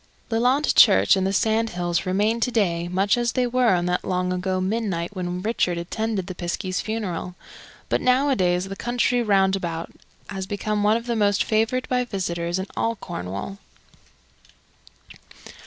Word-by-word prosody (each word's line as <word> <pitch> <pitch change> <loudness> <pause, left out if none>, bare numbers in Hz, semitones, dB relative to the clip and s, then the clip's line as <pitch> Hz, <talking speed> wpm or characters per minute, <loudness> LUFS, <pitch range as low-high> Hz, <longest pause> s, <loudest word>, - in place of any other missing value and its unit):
Lelant 250 +6 +2
Church 95 +1 +6
and 190 0 0
the - - 0
sand 220 +3 +1
hills 175 0 -2
remain 210 +5 +1
to 240 - +1
day 175 -8 0
much 195 +6 +1
as 240 -1 0
they 255 -1 +1
were 245 -4 +3
on 175 0 0
that 180 0 -1
long 180 0 -1
ago 185 +1 -1
midnight 190 -2 -2
when 180 0 -4
Richard 210 -6 0
attended 200 +3 -2
the 185 - -6
piskie's 180 +1 -3
funeral, 185 -5 -4 0.5
but - - 0
nowadays 250 -9 +2
the 195 - -6
country 245 +2 0
round 195 -3 +3
about 170 -3 -4 0.4
has 190 -2 -5
become 210 +1 -2
one 210 +2 +3
of 235 - -7
the 240 -1 -1
most 205 -2 +2
favoured, 225 +4 0
by 250 -1 +1
visitors, 175 -6 -3
in 190 - -3
all 230 0 0
Cornwall. 100 - -6
195 Hz, 160 wpm, -23 LUFS, 180-225 Hz, 0.5 s, Church